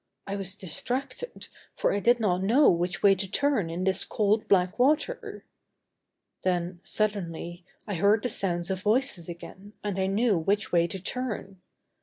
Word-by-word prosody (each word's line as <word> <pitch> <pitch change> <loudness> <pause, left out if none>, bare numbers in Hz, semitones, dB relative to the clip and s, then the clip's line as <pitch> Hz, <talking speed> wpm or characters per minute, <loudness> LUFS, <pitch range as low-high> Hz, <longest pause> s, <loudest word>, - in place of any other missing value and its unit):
I 200 - -4
was 195 -1 -4
distracted, 255 - -4 0.3
for - - +1
I 200 - +1
did 240 +3 +3
not 185 -5 +1
know 240 +10 +5
which 175 +1 -2
way 200 -1 +7
to 195 0 -4
turn 260 -7 +1
in 170 +2 -3
this 190 0 +3
cold, 215 +1 +1
black 185 +2 +2
water. 305 - 0 1.0
Then, 175 -1 -1
suddenly, 175 -4 -2 0.2
I 205 - -4
heard 200 +4 +3
the 250 - 0
sounds 175 -3 -1
of 190 -1 -2
voices 215 -6 0
again 190 +4 -10
and 200 -2 -2
I 190 - +1
knew 205 -1 +2
which 200 +6 0
way 170 -1 +3
to 190 - -6
turn. 195 -3 -5
195 Hz, 165 wpm, -27 LUFS, 180-220 Hz, 1.0 s, way